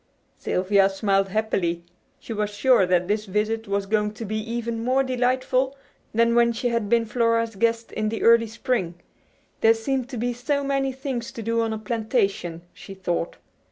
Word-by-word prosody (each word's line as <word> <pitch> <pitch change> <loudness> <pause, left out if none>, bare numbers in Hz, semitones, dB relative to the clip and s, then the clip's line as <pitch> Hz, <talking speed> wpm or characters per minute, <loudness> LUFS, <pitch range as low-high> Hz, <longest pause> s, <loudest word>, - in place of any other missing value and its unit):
Sylvia 195 +1 +2
smiled 195 0 +1
happily. 185 -5 -1 0.3
She 230 - -7
was 210 -1 -1
sure 210 -1 +3
that 180 -1 +2
this 210 +1 0
visit 215 +3 -1
was 200 0 -1
going 210 +1 0
to 225 - -6
be 215 +1 -3
even 230 0 -3
more 260 +2 +2
delightful 255 +1 0 0.3
than 230 +1 +3
when 235 0 +4
she 245 +2 -1
had 230 -3 -1
been 230 0 +3
Flora's 230 0 +1
guest 230 +2 0
in 215 0 -1
the 225 - -3
early 230 0 +6
spring. 225 -6 -2 0.6
There 225 0 +5
seemed 255 +3 -2
to 255 - -6
be 245 +2 -1
so 280 +4 -1
many 275 -1 0
things 260 -3 -4
to 230 - -6
do 230 +1 +1
on 225 -1 -1
a 220 - -2
plantation, 215 -6 -1
she 195 - -11
thought. 175 -3 -2
225 Hz, 180 wpm, -24 LUFS, 205-240 Hz, 0.6 s, early